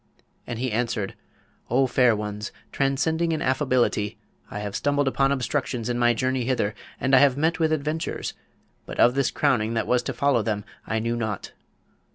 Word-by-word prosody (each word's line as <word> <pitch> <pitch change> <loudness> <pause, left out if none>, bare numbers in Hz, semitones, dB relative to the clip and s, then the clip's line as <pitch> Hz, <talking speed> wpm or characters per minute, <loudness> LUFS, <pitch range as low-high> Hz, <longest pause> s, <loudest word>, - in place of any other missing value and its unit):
And 120 - -4
he 125 +1 -2
answered, 110 -3 -1 0.6
'O 130 +3 +3
fair 125 -2 +4
ones, 105 0 -4 0.2
transcending 160 +5 +1
in 155 - -1
affability, 130 -6 +1 0.3
I - - -6
have 105 -1 -4
stumbled 145 -1 +1
upon 135 +1 +2
obstructions 130 -3 -1
in 120 0 -1
my 120 -1 +4
journey 130 +2 0
hither, 115 -4 0 0.3
and 135 +1 0
I - - +8
have 140 -1 +4
met 160 +4 +1
with 160 -1 +2
adventures, 155 +2 -2 0.5
but - - -7
of 120 - +6
this 135 -1 +1
crowning 115 -6 +1
that 115 - 0
was 125 0 +2
to 130 - -4
follow 135 -1 +2
them 105 -2 -2 0.2
I 110 - 0
knew 115 +2 -1
nought. 110 -4 -3
125 Hz, 180 wpm, -25 LUFS, 115-140 Hz, 0.6 s, I